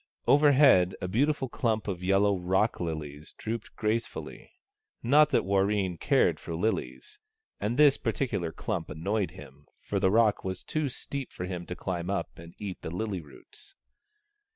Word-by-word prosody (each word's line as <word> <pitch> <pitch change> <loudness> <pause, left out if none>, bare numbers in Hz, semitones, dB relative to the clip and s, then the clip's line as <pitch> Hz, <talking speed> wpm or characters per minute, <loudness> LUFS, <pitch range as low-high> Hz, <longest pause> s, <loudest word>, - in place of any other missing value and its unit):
Overhead 140 -11 +5
a 90 - -3
beautiful 135 +7 +1
clump 110 -4 -1
of 90 -3 -3
yellow 100 +2 +3
rock 95 +4 0
lilies 75 -3 -5
drooped 115 +1 -5
grace 110 +2 0
fully. - - -9 0.5
Not 145 +5 +5
that 140 - +1
Warreen 95 -2 +1
cared - - +2
for 85 - -6
lilies; 110 - -3 0.4
and 115 +4 -2
this 145 -2 +6
particular 110 -8 -1
clump 95 -2 -4
annoyed 95 +6 -1
him, 70 +2 -14
for - - -2
the 95 - +3
rock 110 0 +3
was 95 -1 -4
too 155 -2 -2
steep 135 +1 -6
for 90 - -5
him 90 -2 -5
to 90 - -5
climb 90 -1 -4
up 100 -4 -3
and 85 0 -12
eat 100 -3 -6
the - - -5
lily 95 +1 -3
roots. 75 -3 -15
100 Hz, 160 wpm, -28 LUFS, 90-115 Hz, 0.5 s, this